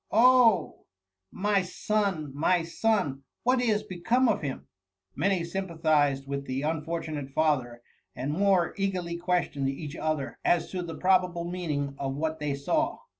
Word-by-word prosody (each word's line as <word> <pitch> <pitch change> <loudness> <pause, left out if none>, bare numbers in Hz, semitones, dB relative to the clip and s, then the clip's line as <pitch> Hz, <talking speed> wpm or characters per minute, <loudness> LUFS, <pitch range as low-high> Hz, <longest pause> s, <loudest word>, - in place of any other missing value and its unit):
Oh 240 -1 +5
I - - -30 0.5
my 205 0 +1
son 185 -5 -1
I - - -9
my 175 +2 +3
son! 170 -5 0 0.2
what 250 +1 +3
is 215 -4 +1
become 230 +9 +1
of 220 - +1
him 140 -4 -4
P^ - - -28 0.5
Many 190 -2 +1
sympathized 160 -6 +1
with 140 0 -4
the 130 +2 -2
unfortunate 155 -2 -3
father, 130 -5 0 0.3
and 135 +4 -2
more 190 -1 +2
eagerly 185 -3 -2
questioned 175 -6 0
each 145 +3 -6
other 150 -7 -2
as 175 - +2
to 185 - -3
the 165 -2 -6
probable 180 -2 +2
meaning 150 -6 -3
of 135 -1 -2
what 160 +2 -2
they 150 -2 -1
saw. 140 0 0
170 Hz, 155 wpm, -28 LUFS, 145-190 Hz, 0.5 s, Oh